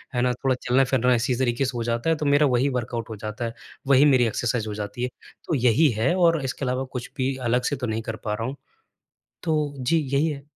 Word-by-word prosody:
है 120 - +2
ना? 125 0 +2
थोड़ा 130 +1 0
चलना-फिरना 125 0 +3
इसी 125 +2 0
तरीके 125 +1 +1
से 130 - -1
हो 115 - -1
जाता 120 +5 -1
है, 165 - +3
तो 150 -1 -4
मेरा 145 +1 +4
वही 130 +4 +2
वर्कआउट 115 0 -5
हो 110 - -5
जाता 110 +3 -4
है, 115 - -4 0.3
वही 140 +1 +6
मेरी 125 -1 +4
एक्सरसाइज़ 115 0 -1
हो 105 - -4
जाती 105 +4 -5
है। 125 - 0 0.4
तो 160 - +1
यही 130 +5 +4
है, 130 +9 +2
और 165 -5 +3
इसके 130 +1 -3
अलावा 130 +1 -1
कुछ 125 -1 -6
भी 130 +1 0
अलग 125 +1 +2
से - - +1
तो 125 - -2
नहीं 110 +1 -2
कर 110 0 -5
पा 105 - -1
रहा 115 +2 -3
हूँ। 135 - -5 0.9
तो 150 -4 0
जी, 130 +6 +1 0.2
यही 140 +3 +3
है। 140 -3 -5
125 Hz, 245 wpm, -24 LUFS, 115-140 Hz, 0.9 s, वही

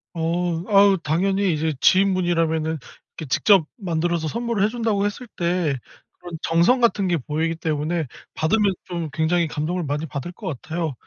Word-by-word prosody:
어 170 +1 -1
아우 200 -1 +5
당연히 190 +4 +1
이제 155 +1 -1
지인분이라면은 170 -4 +2 0.4
이렇게 160 - -5
직접 195 +2 +4
만들어서 170 -4 -1
선물을 235 +1 -1
해 210 - +3
준다고 220 -4 0
했을 205 +5 -6
때 170 -4 0 0.4
그런 175 -2 -8
정성 170 +10 +3
같은 210 -5 +2
게 175 -1 +2
보이기 160 +4 -2
때문에 160 0 -1 0.3
받으면 195 +4 +2
좀 170 -3 -4
굉장히 165 +3 +1
감동을 160 +4 -2
많이 150 +1 -2
받을 140 +3 -5
것 200 +4 -12 0.2
같아요. 160 -3 -3
170 Hz, 350 characters per minute, -22 LUFS, 160-195 Hz, 0.4 s, 아우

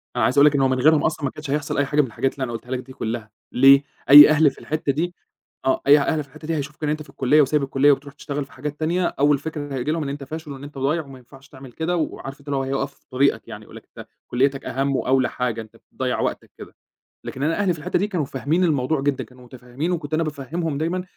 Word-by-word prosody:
أنا 120 - +1
عايز 130 +5 +1
أقول 140 - +7
لَك 150 -1 +4
إن 135 - +2
هو 135 - +4
من 130 0 0
غيرهم 155 +2 +4
أصلًا 155 -1 -1
ما 135 - -1
كانش 150 -2 -9
هيحصل 145 0 -2
أي 145 - +2
حاجة 145 +2 +2
من 135 - -2
الحاجات 130 +3 -2
اللي 135 - -5
أنا 125 - -3
قولتها 120 +2 -8
لَك 130 - -1
دي 130 +1 -11
كُلّها، 110 -2 -5 0.2
ليه؟ 135 +2 +6 0.3
أي 145 +1 +11
أهل 155 -1 +4
في - - -17
الحتّة 155 -2 -1
دي 170 +5 -2 0.5
آه 135 - +1
أي 145 +1 +8
أهل 150 +2 0
في 140 - -22
الحتّة 155 +3 -12
دي 165 - -1
هيشوفوا 150 0 -5
إن 150 - 0
أنت 155 +1 -2
في - - -20
الكلية 145 +4 +3
وسايب 145 +1 +1
الكلية 135 +1 +3
وبتروح 140 +1 -2
تشتغل 145 -1 -5
في 135 - -23
حاجات 145 +2 -6
تانية 175 +3 0
أول 145 -2 +2
فكرة 145 -1 -6
هييجي 130 +4 -2
لهم 160 0 -1
إن 140 - -4
أنت 140 0 -6
فاشل 155 +2 -7
وإن 135 0 -9
أنت 145 0 -10
ضايع 150 +4 0
وما 135 -1 -12
ينفعش 135 +3 -18
تعمل 130 -2 -12
كده، 165 +2 -2
وعارف 140 -3 -4
أنت 145 0 -12
هيقف 135 0 -2
في - - -34
طريقَك 140 +2 +1
يعني - - -9
يقول - - -15
لَك - - -11
أنت - - -9 0.2
كلّيتَك 135 +2 0
أهم 135 +1 -1
وأوّلى 130 0 +1
حاجة 120 -2 -3
أنت 110 - -14
بتضيّع - - -4
وقتَك - - -3
كده، - - -12 0.5
لكن 135 - -5
أنا 165 +6 0
أهلي 190 -4 +2
في 160 - -9
الحتّة 175 +3 -1
دي 205 - 0
كانوا 180 -8 -2
فاهمين 145 +7 -1
الموضوع 150 -3 +1
جدًا 140 -1 -1
كانوا 125 0 -17
متفهمين 125 +6 -5
وكنت 160 -4 -4
أنا 165 +1 +2
بافهمهم 155 +1 -4
دايمًا 170 +4 -2
140 Hz, 265 wpm, -22 LUFS, 135-155 Hz, 0.5 s, أي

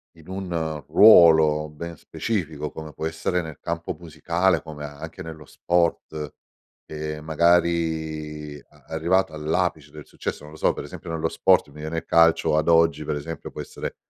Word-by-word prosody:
in 80 -1 -18
un 85 -6 -3
ruolo 80 -7 +7
ben 85 +3 -8
specifico 80 -10 -3
come 80 -1 -9
può 80 - -5
essere 85 +2 -1
nel 80 -4 -8
campo 85 0 -4
musicale, 85 +2 0
come 75 -2 -8
anche 80 +5 -9
nello 80 -2 -9
sport, 85 -2 -1 0.5
ehm, 75 0 -6
magari 80 -2 0
a - - -24
arrivato 85 +2 +1
all'apice 80 0 -1
del 75 -1 -11
successo, - - -6
non 75 - -11
lo - - -11
so, - - +3
per - - -6
esempio 90 - -9
nello 80 0 -1
sport, 90 -1 +3
mi 75 +2 -14
viene 80 +2 -4
il 80 - -4
calcio 80 -2 +4
ad 80 - 0
oggi, 80 -2 +4
per 75 - -2
esempio, 75 +2 -6
può - - -6
essere - - -7
80 Hz, 165 wpm, -24 LUFS, 75-85 Hz, 0.5 s, ruolo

